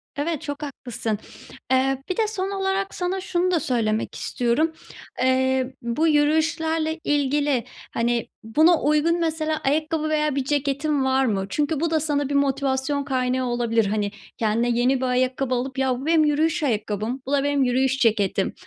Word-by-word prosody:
Evet 300 +1 -2
çok 290 +1 -5
haklısın. 240 -6 -4 0.5
Eee, 265 +1 +2
bir 370 - -2
de 445 - +2
son 395 -2 -3
olarak 390 0 -1
sana 370 +1 -2
şunu 360 0 0
da 340 - +2
söylemek 225 -5 -1
istiyorum. 250 +7 0 0.5
Eee, 260 0 +1
bu 235 +8 0
yürüyüşlerle 315 +1 +1
ilgili, 285 -3 +1 0.3
hani, 235 0 0 0.2
buna 310 +10 +4
uygun 305 +4 +2
mesela 315 -1 -1
ayakkabı 310 +2 0
veya 300 -2 +1
bir 275 - 0
ceketin 285 +1 0
var 265 0 +2
mı? 195 -5 0
Çünkü 295 0 0
bu 335 0 0
da 315 - +3
sana 290 -2 -1
bir 285 - -1
motivasyon 275 0 0
kaynağı 255 -1 0
olabilir. 235 -2 +1
Hani, 205 0 -1 0.3
kendine 230 +2 +1
yeni 245 +3 +2
bir 260 - 0
ayakkabı 255 +1 0
alıp; 260 +2 -3
“ya 260 -2 +1
bu 275 - -7
benim 320 -1 +4
yürüyüş 310 +2 +1
ayakkabım, 220 0 -2
bu 270 - -5
da 280 -1 +2
benim 285 -1 +2
yürüyüş 265 +1 +1
ceketim. 205 -4 +1
275 Hz, 165 wpm, -23 LUFS, 250-310 Hz, 0.5 s, buna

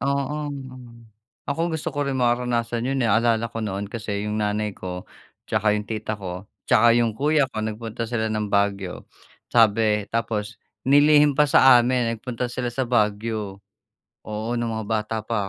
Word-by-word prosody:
oo. 140 +2 -1 1.1
Ako 165 +4 -1
gusto 160 +1 -3
ko 145 -1 -2
rin 135 - -1
mararanasan 120 -1 0
yo'n, 135 0 0
eh, 115 - +2
naalala 115 +1 +2
ko - - -5
noon 100 -1 -4
kasi 105 -3 -4
yung 105 0 -2
nanay 105 0 -1
ko, 90 -1 -7 0.5
tsaka 105 0 +2
yung 105 0 -2
tita 110 0 -3
ko, 95 -1 -7 0.2
tsaka 115 +1 +5
yung 115 -2 +2
kuya 150 +1 +3
ko, 110 - -4
nagpunta 110 +1 -5
sila 110 -2 -1
ng 105 -1 -1
Baguio, 100 -2 -1 0.5
sabi 110 -2 +3
tapos 110 -1 -2 0.3
nilihim 145 +1 +5
pa 150 - +6
sa 130 -2 +7
amin 120 -1 +1
nagpunta 120 +2 -4
sila 125 0 -3
sa 130 +3 -2
Baguio. 105 -3 -1 0.7
Oo, 110 +2 -3
nung 115 -1 -2
mga 110 -1 -4
bata 110 0 -1
pa 110 -3 -1
115 Hz, 165 wpm, -23 LUFS, 105-125 Hz, 1.1 s, sa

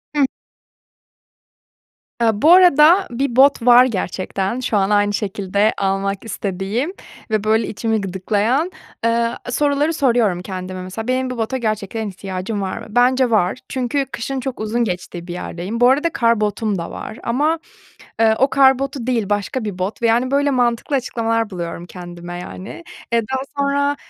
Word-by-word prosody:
Hıh. 285 -2 +4 2.0
Eee, 230 - +4
bu 290 +11 +4
arada 355 +1 +6
bir 245 0 -2
bot 270 -1 +5
var 245 +1 +8
gerçekten, 195 0 -2
şu 235 -4 0
an 195 0 +2
aynı 205 0 +2
şekilde 200 0 0
almak 195 +1 -1
istediğim 205 - -3 0.4
ve, 215 -1 0
böyle, 220 +1 +2
içimi 220 0 -1
gıdıklayan, 210 - 0 0.3
eee, 230 0 +2 0.2
soruları 290 +4 +1
soruyorum 235 - +2
kendime. 185 -1 -6
Mesela, 195 +5 -6
benim 255 0 0
bu 255 - -5
bota 230 +3 -1
gerçekten 215 -2 -2
ihtiyacım 190 +2 -5
var 190 -1 -3
mı? - - -8
Bence 250 +2 +3
var 210 0 +1
çünkü 265 +2 -1
kışın 265 +3 -3
çok 255 0 -5
uzun 220 +3 0
geçtiği 180 -3 -5
bir 175 - -5
yerdeyim. 180 +5 -5
Bu 245 +1 +6
arada 295 +5 +2
kar 230 -2 +2
botum 210 -1 -1
da 170 - -5
var 220 - -7
ama, 300 +7 +1 0.6
eee, 220 -1 +4
o 270 - +4
kar 265 -1 +5
botu 275 -3 -4
değil 230 -5 0
başka 205 +4 -1
bir 195 -3 -4
bot 190 +6 -3
ve, 235 - +3
yani, 240 +3 +2
böyle, 285 +1 +2
mantıklı 245 +2 +1
açıklamalar 230 -3 -1
buluyorum 170 -2 -5
kendime, 175 0 -8
yani. 190 - -8 0.3
Eee, 230 - +4
daha 265 0 0 0.2
sonra, 280 0 +1
225 Hz, 160 wpm, -19 LUFS, 195-260 Hz, 2.0 s, var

